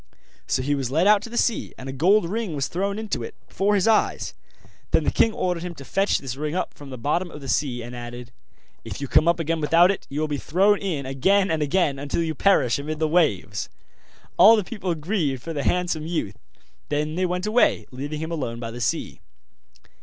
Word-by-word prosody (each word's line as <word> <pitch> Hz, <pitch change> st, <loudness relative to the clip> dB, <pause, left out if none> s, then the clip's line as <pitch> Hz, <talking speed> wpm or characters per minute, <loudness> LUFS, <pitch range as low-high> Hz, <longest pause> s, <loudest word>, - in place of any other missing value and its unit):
So 130 Hz, -, 0 dB
he 145 Hz, +2 st, 0 dB
was 135 Hz, -3 st, -1 dB
led 160 Hz, +7 st, +2 dB
out 210 Hz, 0 st, +6 dB
to 230 Hz, -, -8 dB
the 240 Hz, -, -6 dB
sea, 235 Hz, -, 0 dB
and 130 Hz, -, -9 dB
a -, -, -3 dB
gold 180 Hz, +7 st, +3 dB
ring 205 Hz, -3 st, -3 dB
was 140 Hz, -2 st, -1 dB
thrown 200 Hz, +3 st, -2 dB
into 215 Hz, -, -3 dB
it, 115 Hz, -, -7 dB
before 205 Hz, +2 st, +1 dB
his 195 Hz, +1 st, +2 dB
eyes; 220 Hz, -1 st, +1 dB, 0.6 s
then -, -, +2 dB
the -, -, +1 dB
king 225 Hz, -, +3 dB
ordered 180 Hz, -5 st, -2 dB
him 175 Hz, -1 st, -6 dB
to 140 Hz, -, -11 dB
fetch 195 Hz, +7 st, +1 dB
this 130 Hz, -3 st, -5 dB
ring 150 Hz, +3 st, -3 dB
up 185 Hz, -, -2 dB
from 145 Hz, -1 st, -12 dB
the 130 Hz, -, -7 dB
bottom 160 Hz, +9 st, -1 dB
of 150 Hz, -, -10 dB
the 135 Hz, -, -9 dB
sea, 125 Hz, -3 st, -1 dB
and 120 Hz, +1 st, -8 dB
added: 120 Hz, 0 st, -8 dB, 0.5 s
'If -, -, -7 dB
you 140 Hz, -, -4 dB
come 155 Hz, -, +4 dB
up 170 Hz, 0 st, +3 dB
again 165 Hz, 0 st, -1 dB
without 170 Hz, +5 st, +5 dB
it 195 Hz, -, -6 dB
you 140 Hz, -, -3 dB
will 155 Hz, -, 0 dB
be 145 Hz, -2 st, -3 dB
thrown 195 Hz, +5 st, +3 dB
in 165 Hz, -9 st, -3 dB
again 190 Hz, +9 st, +2 dB
and 160 Hz, -1 st, 0 dB
again 145 Hz, -2 st, +1 dB
until 145 Hz, +4 st, -1 dB
you 160 Hz, -1 st, -2 dB
perish 140 Hz, -8 st, +3 dB
amid 155 Hz, +2 st, -4 dB
the 155 Hz, 0 st, +1 dB
waves.' 145 Hz, -, +1 dB, 0.7 s
All 210 Hz, +6 st, +9 dB
the 210 Hz, -, 0 dB
people 190 Hz, -4 st, -3 dB
grieved 155 Hz, -, -2 dB
for 165 Hz, -, -5 dB
the 145 Hz, -, -2 dB
handsome 175 Hz, -2 st, 0 dB
youth; 160 Hz, -, -2 dB, 0.5 s
then 150 Hz, +1 st, -1 dB
they 185 Hz, +2 st, 0 dB
went 180 Hz, +2 st, -2 dB
away, 220 Hz, +3 st, +2 dB
leaving 145 Hz, +4 st, -5 dB
him 160 Hz, +1 st, -4 dB
alone 125 Hz, -8 st, -3 dB
by 115 Hz, -1 st, -5 dB
the 120 Hz, +1 st, -7 dB
sea. -, -, -2 dB
160 Hz, 230 wpm, -24 LUFS, 140-185 Hz, 0.7 s, All